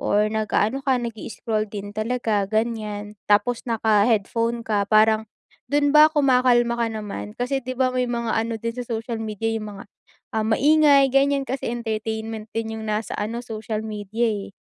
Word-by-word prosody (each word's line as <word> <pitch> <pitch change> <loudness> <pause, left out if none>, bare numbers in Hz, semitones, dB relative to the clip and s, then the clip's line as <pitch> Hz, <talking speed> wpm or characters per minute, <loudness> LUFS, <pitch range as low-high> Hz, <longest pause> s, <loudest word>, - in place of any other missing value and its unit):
Or 210 +1 +2
nag-aano 220 +4 0
ka 265 -2 +3
nag-i-scroll 220 -1 -3
din 205 -1 -6
talaga 220 -2 0
ganyan, 215 -2 -2
tapos 235 +4 +2
naka-headphone 225 +1 +1
ka 205 -2 +1
parang 220 0 +4 0.4
dun 290 0 +3
ba 305 +1 +9
kumakalma 250 -4 +3
ka 235 - +2
naman? 210 -2 -5
Kasi 250 +3 -1
di 255 +1 -4
ba 255 0 +2
may 250 0 +1
mga 235 -2 -2
ano 225 +1 -1
din 230 +1 -3
sa - - -4
social 230 0 -3
media 220 0 -3
yung 210 -2 -5
mga 195 - -10 0.5
ah, 220 - +1
maingay 285 +3 +5
ganyan 275 0 +3
kasi 265 -2 -3
entertainment 220 -1 -4
din 220 -1 -2
yung - - -7
nasa 215 +1 -2
ano 225 +3 -3
social 220 -1 -4
media 215 +2 -2 0.2
eh. - - -12
225 Hz, 165 wpm, -23 LUFS, 215-245 Hz, 0.5 s, ba